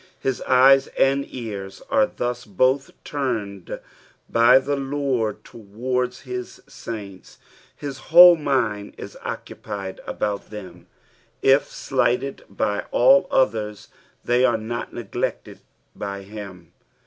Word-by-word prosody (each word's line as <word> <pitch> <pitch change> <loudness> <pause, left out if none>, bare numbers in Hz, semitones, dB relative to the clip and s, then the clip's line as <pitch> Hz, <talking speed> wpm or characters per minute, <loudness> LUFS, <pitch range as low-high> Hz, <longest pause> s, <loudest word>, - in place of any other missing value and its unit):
His 135 -2 -2
eyes 135 +1 +6
and 140 +1 +2
ears 100 -5 -7
are 275 -1 +4
thus 120 - -4
both 130 +6 +1
turned 110 -10 -4 0.5
by 115 +2 +6
the 140 +2 0
Lord 135 -6 -2
towards 125 +4 -3
his 125 -1 -6
saints; 100 -5 -9 0.4
his 140 -2 -7
whole 175 +1 +10
mind 125 -9 -1
is - - -9
occupied 100 -2 -6
about 105 -1 -3
them; 95 -5 -10 0.6
if 135 +2 +5
slighted 135 0 -1
by 100 +1 -1
all 135 +3 +5
others 105 -4 0 0.4
they 120 +1 +3
are 130 - +3
not 115 +2 -5
neglected 115 -5 -4 0.4
by 100 -1 -5
him. 95 -4 -10
120 Hz, 110 wpm, -23 LUFS, 105-135 Hz, 0.6 s, whole